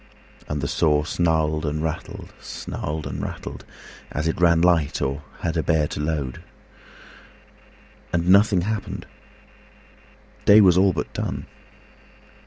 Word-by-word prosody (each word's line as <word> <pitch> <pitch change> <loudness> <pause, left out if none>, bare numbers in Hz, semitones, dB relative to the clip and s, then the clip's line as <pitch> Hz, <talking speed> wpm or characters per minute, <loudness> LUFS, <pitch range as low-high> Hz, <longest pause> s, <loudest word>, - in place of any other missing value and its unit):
And 75 -1 -3
the 70 - -1
saw 75 +1 +2
snarled 80 -2 0
and 75 0 -2
rattled, 80 -1 -5
snarled 75 +1 -5
and - - -4
rattled, - - -6 0.5
As 75 +2 -2
it 80 - -2
ran 85 -1 +5
light, 85 -4 +2
or 70 +2 -2 0.2
had 85 - -1
to 85 - 0
bear 80 -2 +2
a - - -5
load. 75 -4 -2 1.7
And 85 0 0
nothing 100 0 +5
happened: 105 +3 -4 1.4
day 105 +1 +8
was 95 -4 +6
all 95 +1 +5
but 80 - -4
done. - - -3
80 Hz, 130 wpm, -23 LUFS, 75-90 Hz, 1.7 s, day